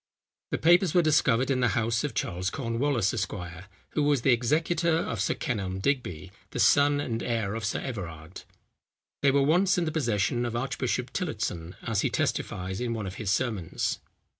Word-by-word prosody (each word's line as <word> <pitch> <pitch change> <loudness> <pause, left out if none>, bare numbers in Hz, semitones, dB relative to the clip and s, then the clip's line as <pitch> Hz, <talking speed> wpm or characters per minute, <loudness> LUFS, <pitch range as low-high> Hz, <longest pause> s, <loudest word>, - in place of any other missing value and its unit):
The - - -1
papers 175 +1 +4
were 175 - +5
discovered 135 -4 +3
in 130 - +1
the 125 -6 +1
house 115 +1 +1
of 145 -6 -3
Charles 90 +1 -1
Cornwallis, 115 -2 0
Esq., 120 - -2 0.6
who 150 - 0
was 145 -4 +2
the 135 - +5
executor 160 +7 +2
of - - -2
Sir - - +1
Kenelm 100 - -3
Digby, 95 - -2 0.2
the - - -5
son 145 +6 +5
and 115 -5 -2
heir 110 -4 -1
of 115 0 -4
Sir 100 - -1
Everard. 90 - -7 0.8
They 140 - +4
were 140 +1 +3
once 180 +7 +3
in 175 - +1
the 155 - -1
possession 120 -5 0
of 120 -1 -3
Archbishop 125 0 -2
Tillotson, 105 - -3
as 115 -4 0
he - - +1
testifies 95 +3 -2
in 120 -1 -1
one 110 -2 -4
of 95 0 -6
his 105 - -2
sermons. 100 -4 -1
120 Hz, 180 wpm, -28 LUFS, 105-145 Hz, 0.8 s, were